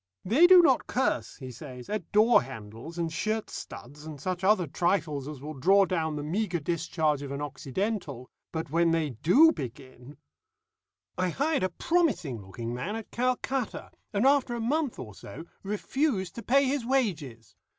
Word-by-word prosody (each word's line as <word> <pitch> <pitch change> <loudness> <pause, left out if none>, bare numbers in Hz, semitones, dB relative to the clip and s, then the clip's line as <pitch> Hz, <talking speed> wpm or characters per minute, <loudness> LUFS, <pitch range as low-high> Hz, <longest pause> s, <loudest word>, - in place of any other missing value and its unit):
"They 275 - +6
do 360 -1 +9
not 270 -6 +3
curse," 185 - -1
he 130 -1 -8
says, 125 -1 -10
"at 210 -5 -4
door 220 +3 +5
handles, 115 +5 -9
and 165 -1 -2
shirt 215 +5 -2
studs, 145 +5 -9
and 155 -2 -8
such 185 +5 -3
other 190 -2 +4
trifles 155 -3 -1
as 145 -3 -8
will 155 +1 -5
draw 195 +8 +4
down 160 -4 -1
the 145 - -4
meagre 180 +3 -1
discharge 155 -2 0
of 140 - -6
an 140 - -4
Occidental, 145 - -4 0.2
but 160 -3 -4
when 170 +1 +3
they 165 -3 +1
do 185 - +5
begin 130 - -9 1.0
"I 185 0 +1
hired 285 - 0
a 185 - +1
promising 180 - 0
looking 115 +5 -6
man 135 - -3
at 225 -1 -7
Calcutta, 255 0 -2 0.2
and 205 +3 +1
after 270 -3 +3
a - - -4
month 280 +3 -1
or 105 -4 -8
so 100 - -10 0.2
refused 210 - -1
to 235 - -7
pay 275 +4 +3
his 270 -1 0
wages. 170 - -2
170 Hz, 170 wpm, -28 LUFS, 140-225 Hz, 1.0 s, do